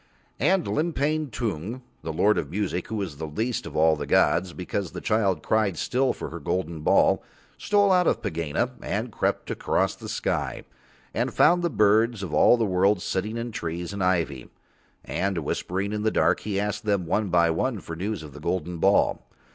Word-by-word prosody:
And 190 -2 +2
Limpang 155 -1 0
Tung, 115 +2 -4 0.2
the 80 - -4
Lord 105 +7 +3
of - - -4
Music, 90 -3 -2
who 110 - -4
was 90 -8 -4
least 110 +11 -2
of - - -9
all 80 0 +4
the 75 -1 -5
gods, 95 -1 +3
because 90 +1 -4
the - - -5
child 105 -4 +1
cried 105 -5 +1
still 130 - +1
for - - -6
her 85 - -6
golden 85 +1 -2
ball, - - +4 0.3
stole 205 -1 +2
out 180 -2 +4
of - - +2
Pegāna 80 -2 -2
and - - -3
crept - - -1
across - - 0
the - - -9
sky, - - -2 0.5
and - - -1
found 175 0 +5
the 170 - +1
birds 110 -2 +3
of 85 -5 -5
all 120 - +6
the 115 - +1
world 95 +1 +2
sitting 105 +5 -2
in 120 0 -4
trees 85 -2 -4
and 100 -2 -2
ivy, 80 -8 0 0.6
and 95 -1 -1
whispering 95 +6 -2
in 105 - -2
the 110 - +2
dark. - - +2
He 100 -2 -2
asked 105 +3 -2
them 100 -4 0
one 100 +5 0
by 85 -1 +4
one 110 +7 -1
for 85 - -7
news 95 0 -3
of 75 -3 -10
the 75 - -10
golden 85 +1 -2
ball. 95 +4 +2
100 Hz, 190 wpm, -25 LUFS, 85-110 Hz, 0.6 s, all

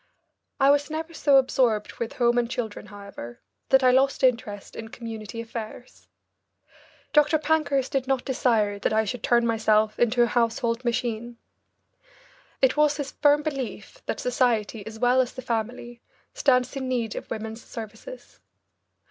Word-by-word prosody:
I 275 0 +6
was 290 +1 +1
never 320 +2 -5
so 285 -3 +4
absorbed 245 -5 +1
with 235 - -3
home 240 0 +2
and 235 -1 -1
children, 230 -5 -5
however, 200 - -10 0.3
that 265 0 +5
I 255 - +6
lost 270 +2 +2
interest 225 -5 0
in 225 - -7
community 225 -1 -7
affairs. 230 +1 -9 1.1
Dr. 300 +1 +5
Pankhurst 295 -4 0
did 265 -2 -1
not 270 -2 0
desire 225 -6 +1
that 210 - 0
I 220 0 +2
should 220 +3 -4
turn 235 +1 +3
myself 220 -1 +2
into 240 +1 +3
a - - +5
household 230 +1 0
machine. 235 -1 -2 1.3
It 260 - +4
was 300 -1 +3
his 280 -2 -4
firm 295 0 +3
belief 290 - -5
that - - -2
society 235 -4 0
as 220 0 -8
well 245 +2 +4
as 250 - -3
the 255 - -8
family 240 0 -4 0.3
stands 255 -1 +2
in 265 -1 -3
need 235 -4 -2
of - - -7
women's 220 +1 -6
services. 230 - -10
240 Hz, 155 wpm, -25 LUFS, 220-265 Hz, 1.3 s, I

